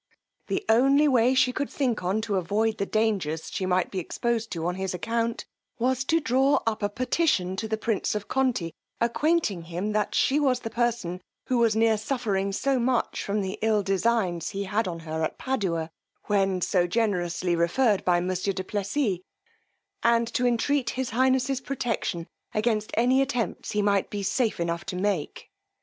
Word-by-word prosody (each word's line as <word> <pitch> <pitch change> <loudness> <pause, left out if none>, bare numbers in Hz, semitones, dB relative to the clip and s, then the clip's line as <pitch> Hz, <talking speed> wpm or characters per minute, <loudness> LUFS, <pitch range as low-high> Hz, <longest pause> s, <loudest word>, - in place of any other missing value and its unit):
The 390 - -2
only 275 +6 +5
way 255 -1 +4
she 260 -1 +3
could 285 +1 -2
think 255 -6 -1
on 190 +5 0
to 210 -3 -1
avoid 210 +5 0
the 200 - -1
dangers 200 -8 -1
she 185 - -2
might 180 0 +1
be 190 - -2
exposed 230 +5 -2
to 165 -2 -3
on 175 - 0
his 190 0 -3
account, 230 +4 -2 0.3
was 260 +2 +1
to 325 +4 +3
draw 270 0 +3
up 225 -1 -1
a 205 - +1
petition 245 - 0
to 220 - -2
the 220 0 -1
prince 215 -1 -1
of 210 -1 -4
Conti, 250 -11 0 0.3
acquainting 235 - +1
him 175 +5 -3
that 210 0 0
she 280 +3 +3
was 260 -4 +2
the 225 - -5
person 230 -7 -1 0.2
who 250 -2 +1
was 230 -2 +3
near 220 -1 +3
suffering 210 -5 -1
so 265 +6 0
much 245 0 0
from 205 +1 -1
the 190 -1 -4
ill 215 -2 +2
designs 195 -3 0
he 200 +1 -3
had 205 +3 -1
on 170 -2 -4
her 160 0 -4
at 155 - -2
Padua, 175 -11 -2 0.3
when 195 -2 +1
so 175 -1 +2
generously 180 -4 0
referred 195 +6 +2
by 175 -1 +3
monsieur 185 +2 -1
du 185 - -4
Plessis, 205 +1 -1 0.8
and 235 0 +3
to 250 -1 +2
entreat 245 +2 +1
his 260 -2 -2
highness's 260 +2 +2
protection 240 -10 -2 0.3
against 215 -1 0
any 250 +4 +4
attempts 245 -4 -2
he 210 -1 +1
might 200 -1 +2
be 205 -1 -4
safe 230 +1 0
enough 170 +1 -2
to 195 -1 -5
make. 185 -5 -2
215 Hz, 180 wpm, -26 LUFS, 185-245 Hz, 0.8 s, only